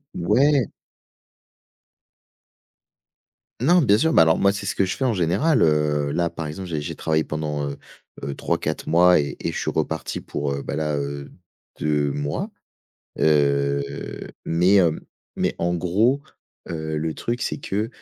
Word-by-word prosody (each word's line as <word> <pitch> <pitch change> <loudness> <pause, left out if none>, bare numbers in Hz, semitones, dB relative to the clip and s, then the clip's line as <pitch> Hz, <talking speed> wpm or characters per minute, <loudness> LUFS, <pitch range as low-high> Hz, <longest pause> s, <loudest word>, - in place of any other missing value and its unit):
Ouais! 130 - +3 2.9
Non, 175 +7 +5
bien 105 -4 +5
sûr, 160 +3 +2
bah, 80 - +7
alors 80 0 +3
moi, 100 - +4
c'est 100 0 -5
ce - - -1
que 95 - +2
je 90 -1 -3
fais 130 - 0
en 120 - +2
général. 95 - +2
Heu, 75 -2 +2
là, 85 -1 0
par 80 -2 -5
exemple, 90 +5 -6
j'ai 80 -3 -2
j'ai 75 - -5
travaillé 80 -1 0
pendant, 75 -2 -3
heu 70 - -6 0.5
heu, 70 - -3
3-4 - - -2
mois 90 +2 +6
et 70 - -3
et - - -2
je - - -5
suis - - -1
reparti - - -2
pour, 70 -1 -3
heu, 70 0 -3
bah, - - -4
là, 75 -1 -1
heu, 70 0 -5 0.5
2 75 -1 +1
mois. 75 +1 -3 0.7
Heu 70 -2 +3 0.6
mais 90 +4 +3
hem 85 -4 +3 0.4
mais - - 0
en 85 +1 0
gros, 105 +11 +2 0.5
heu, 80 -2 -3
le 80 0 -2
truc, 120 +1 -3
c'est - - -2
que, 105 0 -2
80 Hz, 165 wpm, -23 LUFS, 75-95 Hz, 2.9 s, bah